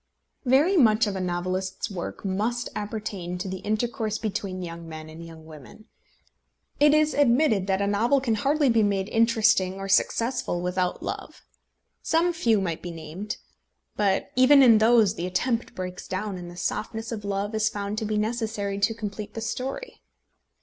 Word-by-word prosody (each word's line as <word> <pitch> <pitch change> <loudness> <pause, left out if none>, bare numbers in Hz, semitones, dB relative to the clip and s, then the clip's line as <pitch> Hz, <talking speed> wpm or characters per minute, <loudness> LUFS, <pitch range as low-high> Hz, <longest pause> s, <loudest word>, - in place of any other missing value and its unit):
Very 290 +10 +4
much 225 -6 +5
of 205 -2 -3
a 190 - -3
novelist's 185 +3 -2
work 185 +1 -6
must 215 +6 -1
appertain 205 -4 -4
to 185 +2 -5
the 190 0 -4
intercourse 215 +1 -2
between 195 -4 -4
young 165 -1 -8
men 155 0 -8
and 165 +1 -10
young 165 -1 -12
women. 155 - -13 0.9
It 295 +1 +6
is 305 0 +3
admitted 240 -7 +3
that 195 0 +1
a - - +1
novel 225 +7 +2
can 250 -4 0
hardly 280 +7 +2
be 230 -2 +4
made 200 -1 0
interesting 220 -5 +3
or 195 0 -6
successful 230 0 +1
without 180 0 -1
love. - - -6 0.6
Some 340 +2 +2
few 230 - +2
might 170 -4 -3
be 175 - -6
named, 165 +6 -6 0.6
but 195 -2 0
even 270 +2 +7
in 230 -4 +7
those 220 -3 +5
the 175 -3 -4
attempt 230 +6 -1
breaks 180 -1 -6
down, 195 +1 -3
and 175 -1 -8
the 175 - -11
softness 225 +4 -3
of 215 -3 -5
love 200 +1 -2
is 220 0 +2
found 205 +1 -4
to 220 - -3
be 215 0 -1
necessary 215 -2 -2
to 210 +3 +1
complete 210 -1 -6
the - - -3
story. 260 - -5
210 Hz, 170 wpm, -25 LUFS, 185-230 Hz, 0.9 s, even